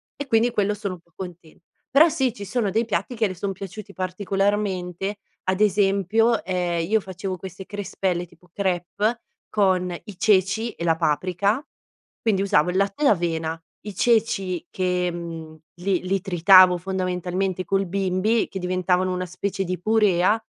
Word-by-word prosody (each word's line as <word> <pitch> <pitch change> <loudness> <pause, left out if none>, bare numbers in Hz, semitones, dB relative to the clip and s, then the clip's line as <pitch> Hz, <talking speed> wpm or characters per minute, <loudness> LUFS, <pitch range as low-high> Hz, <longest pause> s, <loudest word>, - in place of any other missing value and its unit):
E 285 - -6
quindi 235 -1 +3
quello 205 -2 +1
sono 200 -3 -4
un - - -16
po' 170 0 -34
contenta. 175 -1 -10 0.3
Però 310 +5 +7
sì, 260 -5 0
ci 200 -3 -8
sono 215 0 0
dei 225 +4 +1
piatti 245 - -2
che 220 -1 +2
le 185 - -5
son 195 +3 -3
piaciuti 200 +2 -9
particolarmente 195 0 -1 0.3
ad 185 +1 0
esempio, 205 +3 +3
ehm, 175 -2 -1
io 220 0 +4
facevo 190 0 -5
queste 190 +1 -9
crespelle 190 -3 -2
tipo 180 +1 -23
crêpes 200 +4 -1 0.3
con 185 -3 +2
i 205 -4 -10
ceci 210 +3 +2
e 170 - -8
la 165 -1 +3
paprika, 185 - 0 0.6
quindi 210 -4 +1
usavo 180 -3 +3
il 185 - -1
latte 200 +8 0
d'avena, 165 -5 +1 0.2
i 210 -1 -7
ceci 195 -7 +1
che, 180 -1 0
mhmm, 165 -2 -7 0.2
li 190 -1 +1
li 195 -1 +1
tritavo 185 -1 +6
fondamentalmente 185 0 -2
col 195 -1 0
bimby 195 +4 +1
che 190 - -5
diventavano 185 0 +1
una 180 0 -2
specie 195 +2 -3
di 180 -1 -3
purea, 210 -1 +3
190 Hz, 160 wpm, -23 LUFS, 180-205 Hz, 0.6 s, Però